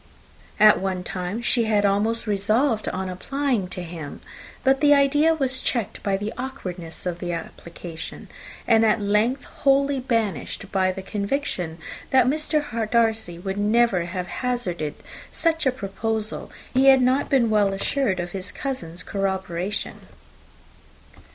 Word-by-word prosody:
At 215 0 +7
one 190 -1 -2
time 185 +6 -4
she 240 -1 +2
had 210 -2 +2
almost 215 +4 +1
resolved 215 +3 +1
on 190 0 -3
applying 245 +3 -1
to 180 0 -5
him, 165 -4 -8 0.4
but 270 0 +3
the 290 -1 +6
idea 290 +3 +4
was 265 -3 0
checked 235 -6 -2
by 195 -1 0
the 210 +3 -4
awkwardness 185 -12 -6
of 175 -1 -2
the 175 -1 -3
application, 165 0 -7 0.4
and 225 -1 +5
at 220 0 +3
length 210 +6 +1
wholly 275 0 +2
banished 225 -5 -2
by 185 -1 +2
the 190 +1 -7
conviction 200 - -2 0.3
that 260 -2 +5
Mr. 290 -5 0
Darcy 220 -6 +1
would 190 +3 -4
never 210 -4 +3
have 180 +1 -4
hazarded 180 - -2 0.4
such 325 -3 +1
a - - +4
proposal, 220 -1 -3 0.2
if 260 - +3
he 270 - +5
had 265 -1 +7
not 260 +3 +2
been 245 -5 +3
well 205 -2 +3
assured 195 0 0
of 175 0 -4
his 190 +1 -6
cousin's 180 - -5
corroboration. 190 -1 -3
215 Hz, 145 wpm, -24 LUFS, 185-260 Hz, 0.4 s, At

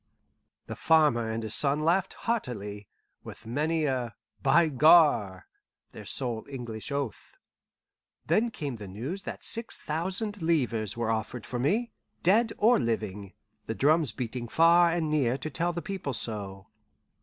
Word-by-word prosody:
The - - -6
farmer 150 -8 +3
and 110 0 -3
his 110 0 -3
son 145 +1 +3
laughed 175 +4 +1
heartily, 105 - -3 0.4
with - - -11
many 155 +7 0
a 125 -5 -2 0.3
"By 170 - +4
Gar!" 145 - +4 0.5
their - - -11
sole 120 -4 -3
English 120 -2 -6
oath. 140 -5 -5 0.9
Then 235 +2 +2
came 145 - -5
the 105 -2 -9
news 125 - -5
that - - -8
six 230 0 -1
thousand 190 +6 -3
livres 120 - 0
were 115 -1 0
offered 110 +1 -3
for 125 - -4
me, 215 - 0 0.3
dead 220 +6 +4
or 230 +4 +4
living, 105 -5 -3 0.3
the 110 - -3
drums 150 +1 +3
beating 120 -1 -5
far 170 +5 +5
and 165 -2 -1
near 135 -5 +1
to 155 - -6
tell 170 +5 -1
the 170 0 -5
people 190 -9 -4
so. 100 -4 -4
140 Hz, 145 wpm, -28 LUFS, 115-170 Hz, 0.9 s, far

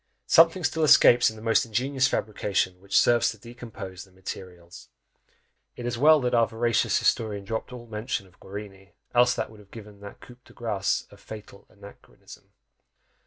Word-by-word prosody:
Something 165 +2 +5
still 160 +1 0
escapes 125 -4 +6
in 110 - -10
the 110 - -12
most 115 +1 +3
ingenious 130 +4 0
fabrication 100 -5 -2
which 95 0 0
serves 120 -1 +3
to 110 - -7
decompose 110 -6 -10
the - - -19
materials. 90 -2 -10 0.9
It 120 - -8
is 120 -1 -2
well 150 +2 +5
our 115 -1 +4
veracious 115 0 +1
historian 105 -3 0
dropped 110 +5 -4
all 125 -1 -9
mention 110 -2 -4
of 95 -1 -24
Guarini 95 -1 -10 0.2
else 125 +1 +4
that - - -4
would 110 - -15
have 100 -1 -18
given 105 -2 -12
that 100 0 -11
coup 125 - -15
de - - -19
grace 100 -4 -2
a 100 - -15
fatal 105 +1 -12
anachronism! - - -16
110 Hz, 165 wpm, -26 LUFS, 100-120 Hz, 0.9 s, escapes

